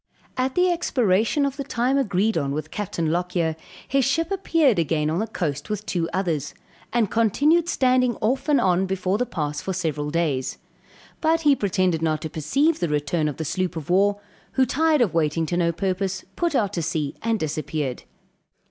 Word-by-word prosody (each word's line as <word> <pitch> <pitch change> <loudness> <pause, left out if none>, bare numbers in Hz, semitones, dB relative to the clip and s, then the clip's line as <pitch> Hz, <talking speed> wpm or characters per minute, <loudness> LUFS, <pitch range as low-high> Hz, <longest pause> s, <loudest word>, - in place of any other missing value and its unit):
At 255 +1 -1
the 360 0 +3
expiration 245 - +1
of 275 0 -3
the 280 - -3
time 255 0 0
agreed 215 -3 +1
on 140 0 -1
with 155 +1 -4
Captain 170 -6 -2
Lockyer, 175 -2 0 0.3
his 275 0 +2
ship 325 +7 0
appeared 330 - +2
again 155 -1 0
on 165 - 0
the 220 - -1
coast 155 -7 -3
with 210 0 -3
two 170 -5 -1
others, 170 -6 -2 0.4
and 230 -4 +1
continued 290 - +3
standing 255 -4 +2
off 260 +9 -1
and 290 -3 +5
on 185 -3 +2
before 190 +1 -1
the 250 - 0
pass 150 -3 -3
for 190 - -3
several 155 -5 -2
days. 150 -5 -1 0.6
But 325 +1 +2
he 295 -3 +5
pretended 185 -6 0
not 155 -1 0
to 160 - -5
perceive 275 - +1
the 170 - -1
return 150 +2 0
of 145 - -4
the 160 - -3
sloop 185 +3 -2
of 160 +1 -5
war, 200 +2 +3 0.3
who 265 - +3
tired 310 +3 +2
of 210 -9 +2
waiting 160 0 +1
to 175 - -2
no 170 -1 +2
purpose 190 +2 -2
put 340 -4 0
out 205 -5 +1
to 170 - -1
sea 155 -3 -2
and 225 -1 0
disappeared. 150 -4 -3
190 Hz, 190 wpm, -23 LUFS, 160-255 Hz, 0.6 s, and